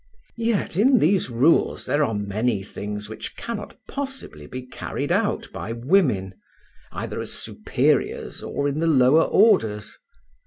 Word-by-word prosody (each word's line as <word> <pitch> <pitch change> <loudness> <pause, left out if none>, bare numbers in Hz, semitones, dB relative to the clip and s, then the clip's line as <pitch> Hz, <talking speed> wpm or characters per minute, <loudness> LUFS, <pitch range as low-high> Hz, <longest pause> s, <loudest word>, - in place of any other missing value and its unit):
Yet 225 -6 0
in 255 +6 +5
these 185 - +2
rules 130 +8 +2
there 150 +1 +2
are 115 -6 0
many 105 +1 -1
things 105 +1 -6
which 110 - -8
cannot 230 -3 -6
possibly 265 - -6
be 130 0 -7
carried 125 - -4
out - - 0
by 115 - -5
women, 120 - +1 0.6
either - - -4
as - - -6
superiors - - -1
or 140 - -2
in 145 +2 -2
the 165 - +1
lower 140 0 +5
orders. 110 - +2
130 Hz, 140 wpm, -23 LUFS, -, 0.6 s, in